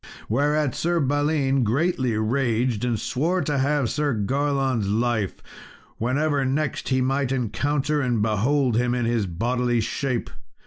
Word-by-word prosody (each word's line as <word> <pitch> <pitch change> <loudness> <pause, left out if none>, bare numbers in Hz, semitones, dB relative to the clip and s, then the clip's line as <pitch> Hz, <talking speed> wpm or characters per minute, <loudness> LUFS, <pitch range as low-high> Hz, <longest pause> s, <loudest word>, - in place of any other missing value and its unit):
Whereat, 145 +3 +1
Sir 170 +1 0
Balin 145 -1 +1
greatly 130 -1 0
raged, 115 0 0
and 120 -3 0
swore 165 - 0
to 145 -1 -1
have 140 -1 +1
Sir 150 -4 0
Garlon's 135 -1 0
life, 110 -2 0 0.6
whenever 140 +4 +1
next 140 +3 -1
he 130 -1 +2
might 135 0 0
encounter 145 +4 0
and 125 -4 0
behold 115 +4 +1
him 125 0 +1
in 120 -1 0
his 115 -4 0
bodily 120 +7 0
shape. 120 +2 -2
130 Hz, 135 wpm, -24 LUFS, 115-145 Hz, 0.6 s, he